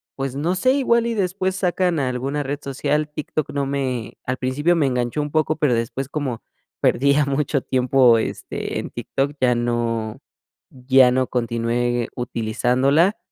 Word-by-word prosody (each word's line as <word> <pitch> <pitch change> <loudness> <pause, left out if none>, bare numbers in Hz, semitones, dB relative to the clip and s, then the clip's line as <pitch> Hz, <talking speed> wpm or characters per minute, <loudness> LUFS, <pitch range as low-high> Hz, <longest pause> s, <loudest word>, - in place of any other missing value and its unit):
pues, 135 -1 -4
no 165 +6 0
sé, 255 +8 +3
igual 235 -4 +2
y 235 - -1
después 190 -1 -1
sacan 180 -3 0
alguna 135 +2 -2
red 145 +1 -3
social. 145 +2 -1
TikTok 150 0 -3
no 140 -1 -1
me 130 -5 -2
al 125 +1 -2
principio 145 +7 +1
me 160 -4 +2
enganchó 125 +3 -1
un 145 0 -4
poco, 155 0 +1
pero 145 -5 +2
después 115 +3 -3
como 140 -6 -3 0.4
perdía 140 +2 +3
mucho 140 0 0
tiempo, 130 -2 +4
este, 110 - -4
en - - -5
TikTok, 140 +1 -2
ya 125 -1 +4
no 120 -1 -1 0.6
ya 130 0 +4
no 130 0 +1
continué 120 0 -1
utilizándola, 125 - +1
135 Hz, 155 wpm, -21 LUFS, 125-150 Hz, 0.6 s, tiempo